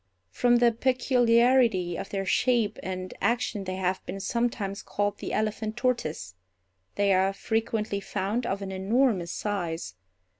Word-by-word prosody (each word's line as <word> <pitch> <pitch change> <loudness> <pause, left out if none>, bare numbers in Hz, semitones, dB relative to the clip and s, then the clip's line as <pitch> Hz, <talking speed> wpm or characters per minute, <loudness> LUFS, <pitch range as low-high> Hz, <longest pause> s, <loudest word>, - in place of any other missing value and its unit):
From 240 - +3
the 240 0 +5
peculiarity 240 -5 +3
of 195 - -5
their 195 -1 -2
shape 230 -1 +1
and 185 0 -5
action 220 -1 0
they 185 0 -3
have 185 0 -1
been 195 +2 -5
sometimes 210 -2 -2
called 205 0 -2
the - - -5
elephant 215 +1 -2
tortoise. 160 - -1 0.6
They 200 -1 +3
are 190 +1 +2
frequently 220 -1 -1
found 200 +4 -2
of 195 +1 -2
an 190 - -5
enormous 190 -2 +1
size. 170 - -3
205 Hz, 140 wpm, -27 LUFS, 190-235 Hz, 0.6 s, the